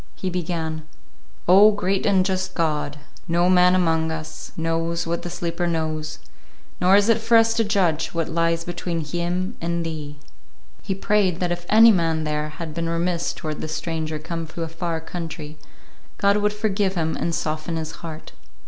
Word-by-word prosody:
He 185 Hz, -, -3 dB
began, 160 Hz, -3 st, -3 dB, 0.6 s
"Oh, 195 Hz, +4 st, +8 dB
great 195 Hz, -2 st, 0 dB
and 190 Hz, -2 st, +4 dB
just 185 Hz, -1 st, -2 dB
God, 150 Hz, -3 st, -1 dB, 0.3 s
no 175 Hz, +2 st, +3 dB
man 180 Hz, 0 st, +5 dB
among 160 Hz, -3 st, +2 dB
us 160 Hz, -1 st, -7 dB
knows 165 Hz, +1 st, -1 dB
what 170 Hz, +1 st, -2 dB
the 175 Hz, -, -5 dB
sleeper 175 Hz, 0 st, -2 dB
knows, 155 Hz, -1 st, -2 dB, 0.6 s
nor 185 Hz, +2 st, +5 dB
is 205 Hz, +1 st, +4 dB
it 230 Hz, -1 st, +4 dB
for 230 Hz, +1 st, +5 dB
us 225 Hz, 0 st, +4 dB
to 230 Hz, 0 st, +2 dB
judge 180 Hz, -7 st, +1 dB
what 165 Hz, -1 st, -2 dB
lies 165 Hz, 0 st, +1 dB
between 175 Hz, -1 st, -3 dB
him 175 Hz, +4 st, -2 dB
and 170 Hz, 0 st, -1 dB
Thee." 150 Hz, -2 st, -5 dB, 0.6 s
He 195 Hz, -, -3 dB
prayed 195 Hz, -3 st, +1 dB
that 180 Hz, -1 st, 0 dB
if 175 Hz, 0 st, -4 dB
any 225 Hz, +2 st, +8 dB
man 165 Hz, -4 st, +1 dB
there 150 Hz, 0 st, -2 dB
had 155 Hz, +1 st, -7 dB
been 165 Hz, 0 st, -2 dB
remiss 170 Hz, 0 st, 0 dB
toward 155 Hz, -2 st, -5 dB
the -, -, -3 dB
stranger 160 Hz, -1 st, -3 dB
come 165 Hz, +1 st, -5 dB
to 165 Hz, +1 st, -5 dB
a -, -, -3 dB
far 165 Hz, 0 st, -3 dB
country, 160 Hz, -3 st, -7 dB, 0.6 s
God 200 Hz, +1 st, +3 dB
would 210 Hz, 0 st, +2 dB
forgive 205 Hz, -2 st, 0 dB
him 160 Hz, -2 st, 0 dB
and 170 Hz, -1 st, -1 dB
soften 155 Hz, +2 st, -2 dB
his 160 Hz, -1 st, -3 dB
heart. 160 Hz, -2 st, -8 dB
170 Hz, 175 wpm, -23 LUFS, 160-185 Hz, 0.6 s, Oh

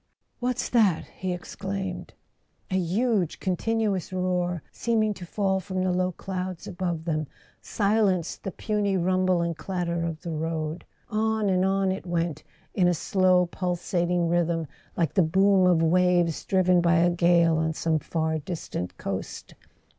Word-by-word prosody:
"What's 250 Hz, 0 st, -1 dB
that?" 210 Hz, -9 st, +3 dB
he 185 Hz, -1 st, -2 dB
exclaimed. 190 Hz, +1 st, -5 dB, 0.6 s
A -, -, +1 dB
huge 190 Hz, 0 st, 0 dB
continuous 200 Hz, 0 st, -1 dB
roar, 180 Hz, -2 st, -1 dB
seeming 220 Hz, -2 st, +1 dB
to 185 Hz, -3 st, -10 dB
fall 190 Hz, 0 st, 0 dB
from 185 Hz, 0 st, -3 dB
the 185 Hz, -, +1 dB
low 180 Hz, 0 st, +1 dB
clouds 185 Hz, 0 st, -5 dB
above 175 Hz, -3 st, -3 dB
them, 155 Hz, -3 st, -1 dB, 0.3 s
silenced 200 Hz, -5 st, +1 dB
the -, -, -4 dB
puny 205 Hz, 0 st, -1 dB
rumble 185 Hz, 0 st, +2 dB
and 170 Hz, -1 st, -2 dB
clatter 170 Hz, -1 st, -2 dB
of 165 Hz, -1 st, -4 dB
the 170 Hz, -, -4 dB
road. 160 Hz, 0 st, -3 dB, 0.3 s
On 220 Hz, -1 st, +1 dB
and 185 Hz, 0 st, +2 dB
on 195 Hz, 0 st, +2 dB
it 190 Hz, 0 st, -5 dB
went, 170 Hz, -2 st, -1 dB, 0.3 s
in 180 Hz, -2 st, +3 dB
a 175 Hz, -, +3 dB
slow 185 Hz, +1 st, +3 dB
pul¬ 180 Hz, 0 st, -2 dB
sating 175 Hz, 0 st, 0 dB
rhythm, 170 Hz, -1 st, +1 dB, 0.3 s
like 165 Hz, -5 st, +1 dB
the -, -, +4 dB
boom 190 Hz, +3 st, +4 dB
of 170 Hz, -2 st, +4 dB
waves 175 Hz, -1 st, +2 dB
driven 185 Hz, -2 st, +3 dB
by 170 Hz, 0 st, +3 dB
a 175 Hz, +1 st, +4 dB
gale 170 Hz, -1 st, +4 dB
on 160 Hz, 0 st, +1 dB
some 160 Hz, 0 st, 0 dB
far 160 Hz, 0 st, -1 dB
distant 140 Hz, -, -5 dB
coast. 95 Hz, -1 st, -5 dB
180 Hz, 155 wpm, -26 LUFS, 170-190 Hz, 0.6 s, the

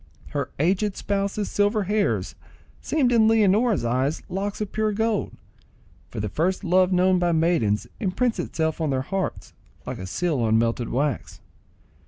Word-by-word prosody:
Her -, -, -3 dB
aged 190 Hz, +6 st, +1 dB
spouse's 200 Hz, +1 st, -2 dB
silver 205 Hz, +1 st, +2 dB
hairs 205 Hz, +2 st, 0 dB, 0.5 s
seemed 275 Hz, -6 st, +1 dB
in 225 Hz, -2 st, +5 dB
Leonora's 220 Hz, -, +3 dB
eyes 130 Hz, +5 st, 0 dB
locks 195 Hz, +2 st, -3 dB
of 210 Hz, -2 st, -3 dB
pure 215 Hz, -1 st, 0 dB
gold; 220 Hz, 0 st, 0 dB, 0.8 s
for -, -, -6 dB
the 105 Hz, -, -2 dB
first 170 Hz, -, -1 dB
love 185 Hz, 0 st, +3 dB
known 185 Hz, 0 st, +3 dB
by 175 Hz, -1 st, +1 dB
maidens 160 Hz, -11 st, +1 dB
imprints 225 Hz, +4 st, 0 dB
itself 160 Hz, 0 st, -2 dB
on 155 Hz, -, 0 dB
their 130 Hz, -1 st, 0 dB
hearts 195 Hz, +5 st, -4 dB, 0.3 s
like -, -, -5 dB
a 95 Hz, -, -6 dB
seal 160 Hz, -, -1 dB
on 110 Hz, -1 st, +2 dB
melted 115 Hz, +1 st, 0 dB
wax. 140 Hz, -1 st, -2 dB
185 Hz, 155 wpm, -24 LUFS, 145-210 Hz, 0.8 s, in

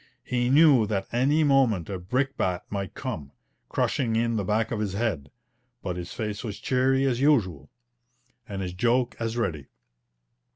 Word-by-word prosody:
He 125 Hz, -1 st, 0 dB
knew 140 Hz, -5 st, +6 dB
that 100 Hz, -2 st, -1 dB
any 140 Hz, +6 st, +3 dB
moment 130 Hz, -, +3 dB
a 95 Hz, -2 st, -4 dB
brickbat 95 Hz, -3 st, -1 dB
might 100 Hz, -2 st, -4 dB
come, 85 Hz, -, -5 dB, 0.4 s
crushing 115 Hz, -4 st, 0 dB
in 115 Hz, 0 st, +1 dB
the 105 Hz, -, 0 dB
back 110 Hz, +3 st, 0 dB
of 115 Hz, -, -2 dB
his 105 Hz, -3 st, -2 dB
head, 100 Hz, -10 st, -2 dB, 0.5 s
but 90 Hz, -2 st, -3 dB
his 90 Hz, -1 st, -6 dB
face 105 Hz, -2 st, -4 dB
was 105 Hz, -4 st, -5 dB
cheery 130 Hz, +3 st, +2 dB
as 130 Hz, -2 st, 0 dB
usual, 95 Hz, -, +2 dB, 0.8 s
and 100 Hz, -1 st, -4 dB
his 90 Hz, -1 st, -4 dB
joke 120 Hz, +6 st, +1 dB
as 115 Hz, 0 st, -2 dB
ready. 80 Hz, -, -2 dB
110 Hz, 160 wpm, -26 LUFS, 95-130 Hz, 0.8 s, knew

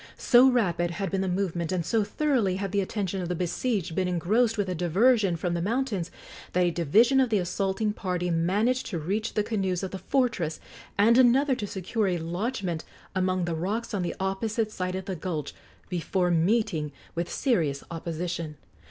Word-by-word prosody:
So 250 Hz, +1 st, +6 dB
rapid 175 Hz, -9 st, +1 dB
had 195 Hz, +1 st, -3 dB
been 195 Hz, -1 st, 0 dB
the 190 Hz, -, -1 dB
movement, 180 Hz, -3 st, -1 dB
and 180 Hz, -3 st, -1 dB
so 225 Hz, +3 st, +2 dB
thoroughly 240 Hz, -6 st, +1 dB
had 195 Hz, 0 st, -3 dB
the 200 Hz, 0 st, +2 dB
attention 195 Hz, -1 st, -2 dB
of 175 Hz, -, -4 dB
the 180 Hz, -, -1 dB
besieged 180 Hz, +1 st, -1 dB
been 185 Hz, +2 st, 0 dB
engrossed 215 Hz, +7 st, +1 dB
with 205 Hz, -, +1 dB
the 185 Hz, -, -2 dB
diversion 190 Hz, +4 st, +3 dB
from 175 Hz, +1 st, -2 dB
the 170 Hz, -, -1 dB
mountains, 210 Hz, -4 st, -1 dB, 0.4 s
that 180 Hz, -, +3 dB
a 175 Hz, -, +2 dB
division 215 Hz, -, +4 dB
of 260 Hz, -2 st, +3 dB
the 215 Hz, -, +2 dB
assaulting 195 Hz, +3 st, -1 dB
party 180 Hz, -3 st, -2 dB
managed 205 Hz, +10 st, +1 dB
to 190 Hz, -, -3 dB
reach 195 Hz, +8 st, -2 dB
the 210 Hz, -, +2 dB
canoes 195 Hz, -4 st, -1 dB
of 190 Hz, -, -3 dB
the 190 Hz, -, -5 dB
fortress, 230 Hz, -, 0 dB, 0.4 s
and 230 Hz, +5 st, +5 dB
another 260 Hz, +3 st, +5 dB
to 210 Hz, -5 st, -3 dB
secure 200 Hz, +3 st, -1 dB
a 180 Hz, -2 st, +1 dB
lodgment 175 Hz, +1 st, -3 dB, 0.3 s
among 185 Hz, -1 st, +1 dB
the 170 Hz, -, -2 dB
rocks 205 Hz, +9 st, -2 dB
on 200 Hz, -, 0 dB
the 175 Hz, -, -2 dB
opposite 215 Hz, +3 st, -1 dB
side 185 Hz, -2 st, -3 dB
of 190 Hz, 0 st, -4 dB
the 190 Hz, -2 st, -3 dB
gulch, 160 Hz, -4 st, -4 dB, 0.3 s
before 180 Hz, 0 st, 0 dB
meeting 170 Hz, -3 st, +1 dB, 0.2 s
with 170 Hz, +1 st, -3 dB
serious 165 Hz, -, 0 dB
opposition. 165 Hz, -1 st, -4 dB
190 Hz, 185 wpm, -27 LUFS, 175-220 Hz, 0.4 s, So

